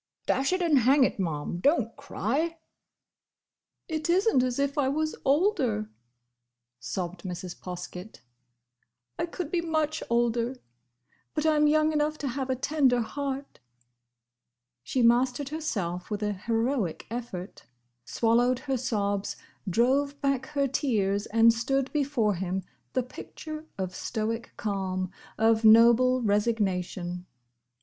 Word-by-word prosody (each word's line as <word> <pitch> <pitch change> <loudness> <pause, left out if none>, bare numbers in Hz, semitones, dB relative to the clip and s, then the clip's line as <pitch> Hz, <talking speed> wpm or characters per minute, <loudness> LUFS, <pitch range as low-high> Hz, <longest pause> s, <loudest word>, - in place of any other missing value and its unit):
"Dash 270 +4 +1
it 370 0 +1
and 310 -5 +4
hang 265 +3 +5
it, 250 - 0
Ma'am, 165 -1 -2
don't 240 - +2
cry!" 285 - -2 1.3
"It 315 0 -3
is 380 +5 +3
n't 265 -13 +4
as 250 -1 -1
if 280 +1 0
I 280 -3 +2
was 310 +2 -1
older," 270 - +1 0.9
sobbed 170 +8 -4
Mrs. 180 -1 -6
Poskett. 180 - -8 1.0
"I - - 0
could 340 -2 -5
be 350 - +1
much 315 -2 -1
older! 235 +1 +1 0.8
But 305 0 0
I'm 300 -1 +4
young 310 +1 +3
enough 300 0 0
to 280 - -3
have 265 +1 -3
a 260 - +1
tender 265 -2 +2
heart!" 275 +3 -4 1.2
She 245 - 0
mastered 250 +3 +3
herself 195 - -3
with 210 0 -3
an 210 0 0
heroic 230 - 0
effort; 230 -6 -6 0.4
swallowed 240 - +2
her 265 0 -2
sobs; 205 -5 -1 0.3
drove 275 +8 +2
back 275 -2 0
her 280 -2 0
tears; 210 -7 0
and 230 +1 +5
stood 265 +3 -1
before 275 -8 +1
him, 190 +1 -3 0.3
the 255 - +1
picture 310 +5 -9
of 185 -1 -3
stoic 225 +1 -3
calm, 190 -3 -2 0.3
of 225 0 +3
noble 235 +3 +6
resignation. 190 -4 -1
245 Hz, 125 wpm, -28 LUFS, 205-285 Hz, 1.3 s, noble